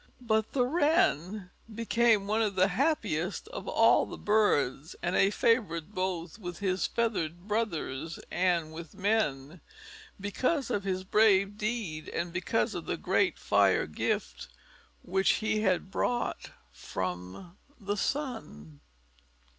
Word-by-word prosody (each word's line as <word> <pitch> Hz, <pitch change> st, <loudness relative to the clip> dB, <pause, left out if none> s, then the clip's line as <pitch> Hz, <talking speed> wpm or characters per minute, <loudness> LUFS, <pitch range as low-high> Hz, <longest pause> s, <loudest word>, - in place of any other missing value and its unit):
But 220 Hz, -2 st, 0 dB
the 250 Hz, -3 st, +2 dB
Wren 245 Hz, -, +1 dB, 0.2 s
became 230 Hz, -1 st, +2 dB
one 215 Hz, +2 st, +1 dB
of 210 Hz, -3 st, 0 dB
the 185 Hz, +1 st, +4 dB
happiest 205 Hz, -, -1 dB
of -, -, -7 dB
all -, -, +4 dB
the -, -, -8 dB
birds, 165 Hz, -8 st, +1 dB
and 175 Hz, +1 st, 0 dB
a 195 Hz, -, +5 dB
favorite 205 Hz, -5 st, +1 dB
both 185 Hz, -1 st, -3 dB
with 180 Hz, -4 st, -6 dB
his 190 Hz, -2 st, 0 dB
feathered 185 Hz, -6 st, -2 dB
brothers 165 Hz, -8 st, -2 dB
and 175 Hz, -3 st, +1 dB
with 165 Hz, +2 st, -9 dB
men, 175 Hz, -7 st, -1 dB, 0.6 s
because 255 Hz, -, -1 dB
of 200 Hz, -1 st, -1 dB
his 185 Hz, -1 st, -1 dB
brave 200 Hz, 0 st, +3 dB
deed, 210 Hz, -8 st, -3 dB
and 170 Hz, 0 st, -3 dB
because 180 Hz, +5 st, 0 dB
of -, -, -6 dB
the -, -, -1 dB
great -, -, +1 dB
fire -, -, +3 dB
gift -, -, -3 dB, 0.6 s
which 190 Hz, +2 st, +2 dB
he 215 Hz, 0 st, 0 dB
had 190 Hz, -2 st, 0 dB
brought 240 Hz, +4 st, -1 dB, 0.2 s
from 90 Hz, -, -6 dB, 0.2 s
the 205 Hz, -1 st, -2 dB
sun. 210 Hz, -, -4 dB
195 Hz, 130 wpm, -29 LUFS, 170-220 Hz, 0.6 s, a